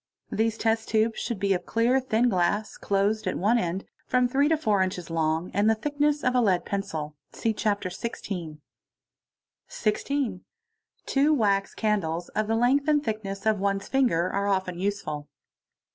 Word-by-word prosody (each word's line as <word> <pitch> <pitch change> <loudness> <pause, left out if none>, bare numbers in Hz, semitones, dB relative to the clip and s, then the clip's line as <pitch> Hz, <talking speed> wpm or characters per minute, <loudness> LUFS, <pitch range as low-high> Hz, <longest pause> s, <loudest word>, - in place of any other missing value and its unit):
These 225 0 0
test 225 0 0
Bids 220 +1 +2
should 235 -2 -3
be 195 0 +2
of 180 -1 -3
clear, 235 +3 +3
thin 245 -2 +1
glass, 200 +1 0
closed 205 +2 0
at - - -1
one 220 +6 +3
end, 180 0 -2 0.2
from 250 -1 +3
three 275 +4 +2
to 320 - +3
four 215 -9 +1
nches 185 -3 -2
long, 160 +1 0
and 205 +2 +3
the 225 - +4
thickness 290 +4 0
of 250 - +2
a 250 - +3
lead 190 -6 +2
pencil, 155 -7 -4
(see 225 - -1
Chapter 205 -3 -1
XVL.). 180 -5 -5 0.6
| - - -64
16. 220 -2 -1 0.6
Two 285 +3 +3
wax 200 -5 +1
candles 175 -6 -1
of 215 0 -1
the 225 - +1
length 260 +5 +2
and 295 -1 +3
thickness 205 -4 -4
of 215 -2 +2
one's 195 0 -1
finger 240 -11 +2
are 200 +1 0
often 190 -3 -1
useful. 155 -7 -3
210 Hz, 170 wpm, -26 LUFS, 185-235 Hz, 0.6 s, the